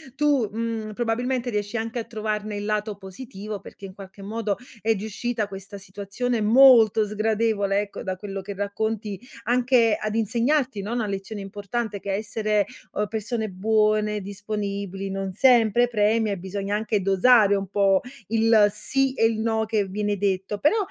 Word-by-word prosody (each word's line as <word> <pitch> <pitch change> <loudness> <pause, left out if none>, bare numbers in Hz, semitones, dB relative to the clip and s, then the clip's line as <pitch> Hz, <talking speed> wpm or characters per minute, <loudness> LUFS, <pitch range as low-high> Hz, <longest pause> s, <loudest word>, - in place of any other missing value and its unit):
tu, 280 -6 +2
mhmm, 225 -1 -3
probabilmente 245 +2 -1
riesci 205 +2 -2
anche 225 +2 -3
a 230 - -3
trovarne 215 -1 -3
il 205 0 -4
lato 210 0 -1
positivo 205 +1 -8
perché, 200 - -12
in 190 - -9
qualche 195 0 -12
modo, 210 -1 -2 0.2
è 225 +1 +2
riuscita 220 +2 -3
questa 195 0 -9
situazione 200 +5 -3
molto 225 -2 +6
sgradevole, 215 -1 0
ecco, 205 -1 -5
da 185 -1 -3
quello 195 0 -6
che 200 +1 -7
racconti, 205 0 -3 0.2
anche 240 -1 +3
ad 215 0 -2
insegnarti, 235 +1 +1
no, 215 +4 -4
una 235 -2 -1
lezione 200 +1 -5
importante: 205 +2 -4
che 200 - -4
essere, 210 0 0 0.3
uhm, 210 - 0
persone 220 +1 -3
buone, 210 +2 +1
disponibili, 200 -1 -4
non 195 0 -3
sempre 240 0 +4
premia 215 -1 +2
e 195 - -3
bisogna 195 +2 -4
anche 210 -2 -1
dosare 200 +2 +5
un 195 -1 -1
po' 195 -1 +3 0.3
il 225 -1 +5
sì 265 +6 0
e 225 - +2
il 225 -1 +1
no 220 -1 0
che 215 -2 +1
viene 205 +2 -2
detto, 195 +1 -1
però 300 - +3
210 Hz, 160 wpm, -24 LUFS, 200-225 Hz, 0.3 s, molto